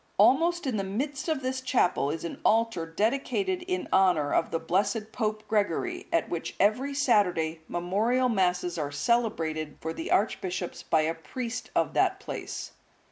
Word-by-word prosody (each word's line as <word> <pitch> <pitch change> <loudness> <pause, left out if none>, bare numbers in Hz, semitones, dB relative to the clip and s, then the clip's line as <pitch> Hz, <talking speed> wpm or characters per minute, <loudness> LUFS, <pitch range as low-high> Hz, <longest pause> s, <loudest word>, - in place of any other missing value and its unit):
(181) 270 +5 +6
Almost 345 -1 0
in 255 -5 0
the 195 - -1
midst 270 - -3
of 310 -4 0
this 260 0 -2
chapel 240 - +2
is 160 +2 -3
an 170 - -6
altar 225 -7 +2
dedicated 275 - 0
in 365 -1 -2
honour 175 -7 +3
of - - +2
the - - 0
blessed 200 +6 0
Pope 215 -2 -2
Gregory, 350 - -1
at 335 - +2
which 170 -1 -4
every 250 +8 +2
Saturday 180 - +2
memorial 215 +9 +1
Masses 180 -5 0
are 145 -1 -2
celebrated 160 -4 0
for 160 0 -4
the 165 - -5
archbishops 185 -3 -1
by 160 - +2
a 160 +1 0
priest 245 +9 -5
of - - +1
that - - +2
place. - - -6
210 Hz, 165 wpm, -28 LUFS, 170-255 Hz, -, 181